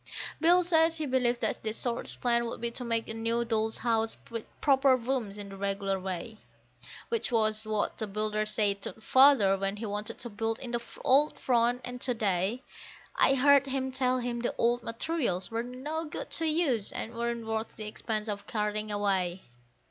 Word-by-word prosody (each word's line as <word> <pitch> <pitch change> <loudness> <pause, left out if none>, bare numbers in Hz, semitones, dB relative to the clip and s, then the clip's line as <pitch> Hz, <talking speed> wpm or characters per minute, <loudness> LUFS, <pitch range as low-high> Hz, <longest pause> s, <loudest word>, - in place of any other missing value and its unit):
Bill 350 +2 +5
says 325 -1 +4
he 310 - -2
believes 250 -3 +1
that 220 -2 -2
the 220 - -1
shortest 235 +1 -1
plan 235 -1 +2
would 230 - -5
be 235 0 -2
to 250 - -5
make 230 -1 -1
a - - -4
new 230 +1 -1
Doll's 220 -1 0
House 225 -2 +1
with 230 -1 -5
proper 270 -2 +4
rooms, 235 -5 -3
in 205 -1 -7
the 195 - -9
regular 195 0 -1
way; 190 +4 -5 0.7
Which 460 - -1
was 215 -1 +2
what 215 -1 -1
the 220 - -2
builder 215 +1 -1
said 205 -2 +1
to - - -5
Father 230 -3 +5
when 195 +1 -1
he 225 - -5
wanted 210 +1 -4
to 240 0 -3
build 225 +2 -2
in 245 - -7
the 240 -1 -1 0.2
old 285 +2 +4
front; 245 0 +1
and 250 0 -7
to 250 -2 +1
day 205 +3 0 0.5
I 270 - +4
heard 280 +1 +5
him 265 0 -2
tell 255 -1 +1
him 240 -1 -3
the 240 - -2
old 240 +1 +2
materials 230 - -2
were 225 +1 -1
no 270 +7 -5
good 300 - -7
to 325 - +2
use 300 - +1
and 230 - -5
weren't 235 0 -3
worth 220 0 -3
the 215 - -6
expense 215 0 -3
of 205 -1 -5
carting 210 0 -2
away. 195 -3 0
230 Hz, 195 wpm, -29 LUFS, 215-255 Hz, 0.7 s, Bill